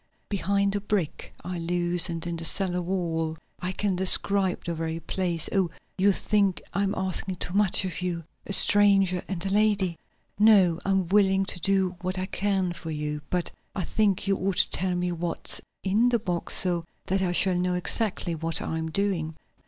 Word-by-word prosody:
"Behind 200 0 0
a 205 - -2
brick 200 -6 -3
I 180 0 -5
loosened 175 0 -1
in 170 -1 -3
the 165 - -1
cellar 180 +1 +2
wall. 165 -3 -2 0.2
I 180 +1 -3
can 195 0 -1
describe 190 +1 +2
the 170 - -2
very 165 0 -4
place. 170 -1 -1
Oh, 190 -4 +1 0.3
you 200 +2 +3
think 200 -2 0
I 200 - 0
am 200 0 -1
asking 190 0 +1
too 175 - -5
much 200 -1 +2
of 180 -1 -5
you 175 -2 -3 0.2
a - - -5
stranger 195 -3 +5
and 185 -2 -4
a - - -1
lady." 200 -4 +1 0.4
"No, 195 -6 +5
I'm 195 -1 +1
willing 195 -1 +3
to 185 - -3
do 190 0 0
what 185 +1 -3
I 185 - -2
can 190 -2 -1
for 165 -1 -8
you. 150 -1 -4
But 180 -1 -2 0.2
I 190 - -2
think 200 +1 +1
you 195 - +2
ought 190 -1 -2
to - - +3
tell 185 0 +1
me 180 0 -1
what's 170 0 -2 0.2
in 215 +6 +2
the 240 - +2
box, 180 -6 +1
so 175 -2 +5 0.2
that 190 +1 -1
I 180 -2 0
shall 185 +1 +3
know 180 0 -1
exactly 180 -1 +2
what 165 0 -2
I 160 - -4
am 160 0 -4
doing." 165 -3 -2
185 Hz, 190 wpm, -26 LUFS, 175-195 Hz, 0.4 s, stranger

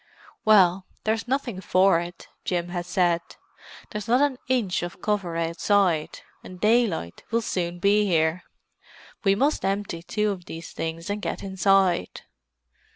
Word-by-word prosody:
"Well, 190 -3 +5 0.2
there's 220 +2 -1
nothing 245 -7 -2
for 185 -2 +4
it," 175 +1 -8 0.2
Jim 175 -1 -2
had 175 -1 -4
said. 175 -2 +2 0.7
"There's 210 -1 -5
not 245 +2 +4
an 280 -3 +1
inch 240 -8 +1
of 175 0 -6
cover 195 -5 -1
outside, 170 0 +1 0.2
and 180 -1 -11
daylight 210 - +1
will 230 0 0
soon 175 -4 -2
be 205 +3 +3
here. 165 0 +2 0.8
We 195 -1 +4
must 280 +8 +1
empty 195 -3 -2
two 210 +5 -1
of 180 -3 -7
these 165 -1 -8
things 165 +3 -4
and 205 +1 -3
get - - -4
inside." 190 -2 +2
190 Hz, 145 wpm, -25 LUFS, 175-210 Hz, 0.8 s, Well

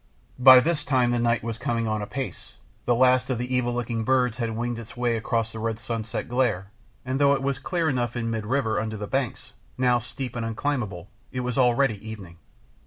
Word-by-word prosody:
By 130 0 +9
this 155 0 0
time 130 -4 +2
the 120 - +1
night 115 -1 +1
was 115 -1 -4
coming 115 -1 -1
on 110 -1 -1
apace, 130 +6 -6 0.3
the 120 - +3
last 130 +1 +4
of 130 - 0
the 125 +2 -2
evil 125 -1 +1
looking 120 -2 -2
birds 125 -1 +2
had 115 -3 -2
winged 120 0 -2
its 115 +3 -11
way 120 -1 +1
across 115 0 -1
the 110 - -7
red 110 0 -2
sunset 115 -1 -4
glare, 115 -6 0 0.3
and 130 +1 -1
though 140 0 +5
it 135 -1 -1
was 135 -1 -1
clear 170 +3 -1
enough 125 -5 -1
in 115 -1 -2
mid 110 -2 -3
river 125 -3 +1
under 110 0 -3
the 105 - -4
banks, 130 +1 -3 0.2
now 125 -1 +3
steep 125 +1 -6
and 120 - -2
unclimbable, 115 -6 -2 0.2
it 125 - -3
was 125 -1 -2
already 125 -4 +2
evening. 100 -6 -9
120 Hz, 210 wpm, -25 LUFS, 115-130 Hz, 0.3 s, By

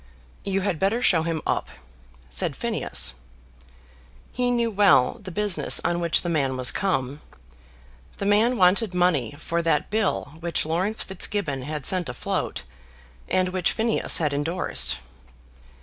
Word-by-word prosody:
"You 195 0 -1
had 185 -5 -1
better 220 +6 +1
show 165 -8 +4
him 165 -1 -3
up," - - -1 0.6
said - - -1
Phineas. - - 0 1.2
He 250 0 0
knew 235 -2 +1
well 195 -11 +4
the 190 - -8
business 205 0 +2
on 175 - +1
which 170 -1 +2
the - - -3
man 140 -6 0
was 125 -1 +3
come. 145 -7 -2 1.0
The - - -4
man 220 +5 +3
wanted 185 +1 +3
money 160 -9 +1
for 170 +2 -2
that 165 -1 0
bill 200 -8 -1
which 170 -1 -1
Laurence 185 +7 0
Fitzgibbon 190 -7 -3
had 150 0 -4
sent 180 -6 +2
afloat, 120 - -3 0.7
and 185 0 +2
which 185 -1 0
Phineas 225 0 +1
had 150 -3 0
endorsed. 145 - 0
175 Hz, 140 wpm, -24 LUFS, 150-200 Hz, 1.2 s, show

